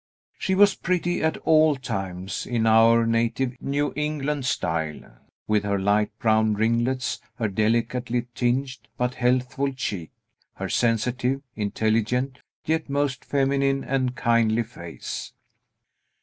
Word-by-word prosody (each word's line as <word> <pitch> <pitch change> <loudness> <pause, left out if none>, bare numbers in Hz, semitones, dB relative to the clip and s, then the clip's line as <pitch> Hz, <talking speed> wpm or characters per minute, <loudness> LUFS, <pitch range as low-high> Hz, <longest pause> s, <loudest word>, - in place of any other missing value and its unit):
She 190 - 0
was 200 0 +6
pretty 175 -1 -1
at 160 0 +1
all 155 -1 +5
times, 95 -7 -4
in 115 -2 0
our 115 +1 +5
native 115 +3 0
New 145 +1 -1
England 150 -2 -2
style, 80 - -3 0.3
with 105 -1 +2
her 100 -1 0
light 100 +2 +2
brown 110 -1 +2
ringlets, 120 +4 0
her 115 - -1
delicately 115 +4 0
tinged, 130 +2 0 0.2
but 125 0 0
healthful 125 +2 0
cheek, 100 - -4 0.5
her - - -4
sensitive, 125 +3 0
intelligent, 110 +5 0 0.3
yet 160 -1 -1
most 140 -2 -1
feminine 135 0 +1
and 130 -2 -1
kindly 115 -1 +2
face. 85 -6 -7
125 Hz, 120 wpm, -25 LUFS, 110-135 Hz, 0.5 s, was